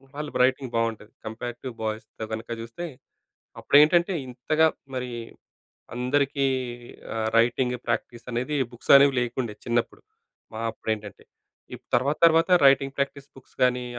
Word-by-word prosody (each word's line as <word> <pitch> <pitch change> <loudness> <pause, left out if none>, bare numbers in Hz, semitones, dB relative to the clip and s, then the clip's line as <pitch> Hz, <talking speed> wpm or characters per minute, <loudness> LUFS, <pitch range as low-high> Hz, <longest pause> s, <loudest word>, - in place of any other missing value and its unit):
వాళ్ళ 150 +1 -4 0.2
రైటింగ్ 130 0 +1
బావుంటది, 115 -1 -2 0.2
comparative 120 +2 -6
boys 110 0 -3 0.3
కనుక 110 +1 -6
చూస్తే. 115 +10 -7 0.8
అప్పుడు - - +3
ఏంటంటే, 170 +4 +3 0.2
ఇంతగా 155 +6 +1 0.3
మరీ, 125 -1 -4 0.8
అందరికీ 140 +2 +1 0.7
ఆహ్, 110 0 -1
రైటింగ్ 125 +2 +2
ప్రాక్టీస్ 120 -1 -3
అనేది 125 +6 -2 0.2
బుక్స్ 120 - 0
అనేవి 140 0 +5
లేకుండే 120 -2 -3
చిన్నప్పుడు, 120 -1 -1 0.5
మా 110 - -5
అప్పుడు 110 - -6
ఏంటంటే, 105 -2 -12 0.5
ఇప్ - - -12
తర్వాత, 140 +5 0
తర్వాత 165 +1 +4 0.2
రైటింగ్ 135 0 +4
ప్రాక్టీస్ 140 0 -3
బుక్స్ 135 - -18
గాని, 125 0 +1
125 Hz, 130 wpm, -25 LUFS, 115-140 Hz, 0.8 s, అనేవి